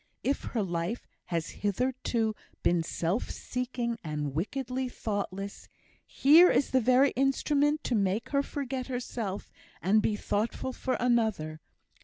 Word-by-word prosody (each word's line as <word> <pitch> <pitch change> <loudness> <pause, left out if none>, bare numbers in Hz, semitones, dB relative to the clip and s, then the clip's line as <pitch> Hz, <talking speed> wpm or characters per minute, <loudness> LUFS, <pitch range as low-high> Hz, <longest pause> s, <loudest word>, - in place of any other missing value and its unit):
If 275 - 0
her 225 -4 -1
life 175 +5 -2 0.2
has 170 -2 -2
hitherto 225 +1 0 0.3
been 175 -1 +3
self 170 +5 -1
seeking, 245 -2 -3
and 150 -3 -3
wickedly 255 - -2
thoughtless, 200 -3 -4 0.4
here 320 +6 +7
is 280 - +2
the 260 - +4
very 255 +4 +5
instrument 290 +3 +2
to - - -1
make 205 +1 +1
her 280 -1 +2
forget 270 -3 -4
herself, 240 -6 -4 0.3
and 205 +5 +3
be 210 - +1
thoughtful 220 +5 -2
for 260 - -1
another. 220 -11 +1
235 Hz, 130 wpm, -29 LUFS, 195-260 Hz, 0.4 s, here